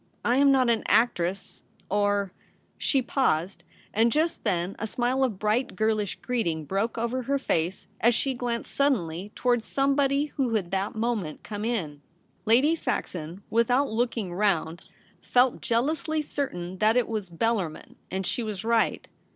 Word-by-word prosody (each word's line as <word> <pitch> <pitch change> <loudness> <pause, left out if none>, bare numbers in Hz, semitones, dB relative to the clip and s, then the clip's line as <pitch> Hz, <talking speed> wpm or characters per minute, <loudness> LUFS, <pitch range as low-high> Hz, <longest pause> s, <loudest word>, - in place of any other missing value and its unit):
I 245 +2 +3
am 280 0 +6
not 260 -2 +4
an 230 -2 +2
actress 200 -4 +1
— - - -27
or 205 -1 +1 0.2
' - - -39
She 270 -3 +1
paused; 195 - 0 0.3
and 230 +2 +3
just 320 +5 0
then 185 -3 -1
a 220 - -2
smile 250 +4 0
of 235 -7 0
bright 215 +5 0
girlish 215 -1 0
greeting 170 -11 -1
broke 200 +8 -1
over 235 +3 -1
her 280 +3 0
face 175 -8 -1
as 235 0 +4
she 270 +2 0
glanced 240 -2 -3
suddenly 205 - 0
towards 240 -3 +1
somebody 275 +1 +2
who 250 -5 +1
had 185 -5 -1
that 195 +2 -1
moment 220 -8 -2
come 210 -1 -5
in. 170 -11 -2 0.4
Lady 255 +8 +5
Saxon, 180 - -3
without 245 +4 +2
looking 225 -5 -1
round, 175 -4 0 0.4
felt 250 0 +2
jealously 305 +6 0
certain 185 -12 -4
that 220 +2 +4
it 245 - +2
was 215 -5 -3
Bellarmin, 185 -2 -2
and 190 +1 -3
she 240 - -1
was 215 -3 -4
right. 230 -1 +1
225 Hz, 160 wpm, -27 LUFS, 190-250 Hz, 0.4 s, am